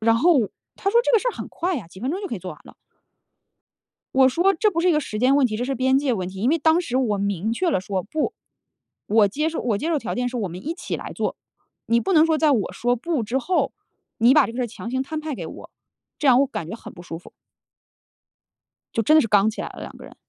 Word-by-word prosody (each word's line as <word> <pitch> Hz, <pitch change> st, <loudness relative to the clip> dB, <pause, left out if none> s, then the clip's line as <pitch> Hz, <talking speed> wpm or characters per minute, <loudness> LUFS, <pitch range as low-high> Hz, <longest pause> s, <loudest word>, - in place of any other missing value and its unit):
然 225 Hz, +1 st, +3 dB
后 270 Hz, -, +3 dB, 0.3 s
他 395 Hz, -, -1 dB
说 470 Hz, -, +5 dB
这 -, -, 0 dB
个 455 Hz, -, +6 dB
事 -, -, -1 dB
儿 -, -, -1 dB
很 -, -, -7 dB
快 355 Hz, +1 st, -2 dB
呀， 215 Hz, -11 st, -6 dB
几 185 Hz, +3 st, -13 dB
分 255 Hz, +4 st, -2 dB
钟 365 Hz, +5 st, -3 dB
就 395 Hz, -, -5 dB
可 -, -, -3 dB
以 -, -, -5 dB
做 185 Hz, +1 st, -7 dB
完 -, -, -16 dB
了。 -, -, -14 dB, 1.4 s
我 265 Hz, 0 st, +6 dB
说 355 Hz, +9 st, +3 dB
这 420 Hz, +4 st, +2 dB
不 335 Hz, -, -1 dB
是 360 Hz, +2 st, +3 dB
一 -, -, +4 dB
个 300 Hz, -, +3 dB
时 215 Hz, -7 st, -5 dB
间 255 Hz, +3 st, +4 dB
问 285 Hz, -2 st, +4 dB
题， 215 Hz, -3 st, -2 dB
这 240 Hz, -, -2 dB
是 270 Hz, -, -2 dB
边 260 Hz, +2 st, +3 dB
界 280 Hz, -3 st, 0 dB
问 185 Hz, -5 st, -3 dB
题， 190 Hz, 0 st, -8 dB
因 240 Hz, -, +2 dB
为 330 Hz, -, +3 dB
当 320 Hz, +2 st, +3 dB
时 255 Hz, -6 st, -2 dB
我 220 Hz, -6 st, +1 dB
明 200 Hz, +1 st, -1 dB
确 355 Hz, +6 st, 0 dB
了 185 Hz, -, 0 dB
说 190 Hz, -2 st, -3 dB
不。 305 Hz, +9 st, -2 dB, 0.7 s
我 210 Hz, -1 st, +4 dB
接 300 Hz, +10 st, -1 dB
受 325 Hz, -, -4 dB
我 225 Hz, -5 st, 0 dB
接 310 Hz, -, -3 dB
受 330 Hz, -, +1 dB
条 -, -, -4 dB
件 245 Hz, 0 st, 0 dB
是 250 Hz, -, -5 dB
我 205 Hz, -, -1 dB
们 180 Hz, +8 st, -9 dB
一 325 Hz, -, -1 dB
起 350 Hz, -, -5 dB
来 -, -, -7 dB
做， -, -, -2 dB, 0.5 s
你 235 Hz, +1 st, +3 dB
不 385 Hz, -, 0 dB
能 315 Hz, -1 st, +6 dB
说 320 Hz, -1 st, +2 dB
在 310 Hz, -1 st, +3 dB
我 225 Hz, -8 st, 0 dB
说 245 Hz, +1 st, 0 dB
不 285 Hz, +1 st, -2 dB
之 235 Hz, +5 st, -1 dB
后， 360 Hz, +7 st, 0 dB, 0.5 s
你 240 Hz, +4 st, +5 dB
把 300 Hz, -3 st, +6 dB
这 -, -, -6 dB
个 -, -, -7 dB
事 255 Hz, -, 0 dB
儿 240 Hz, -, -2 dB
强 225 Hz, +1 st, -8 dB
行 260 Hz, +1 st, -1 dB
摊 310 Hz, +3 st, -4 dB
派 310 Hz, -1 st, -4 dB
给 -, -, -6 dB
我， -, -, -10 dB, 0.5 s
这 295 Hz, -, +1 dB
样 250 Hz, 0 st, +6 dB
我 280 Hz, -, +2 dB
感 165 Hz, -, -5 dB
觉 -, -, -5 dB
很 -, -, -11 dB
不 175 Hz, -, -11 dB
舒 165 Hz, -2 st, -7 dB
服。 175 Hz, -, -15 dB, 1.6 s
就 225 Hz, -, +2 dB
真 310 Hz, +9 st, +5 dB
的 310 Hz, -, +7 dB
是 225 Hz, -, -1 dB
刚 205 Hz, +1 st, +4 dB
起 220 Hz, -, -5 dB
来 -, -, -5 dB
了 -, -, -11 dB
两 -, -, -8 dB
个 -, -, -11 dB
人， -, -, -14 dB
255 Hz, 310 characters per minute, -23 LUFS, 220-315 Hz, 1.6 s, 的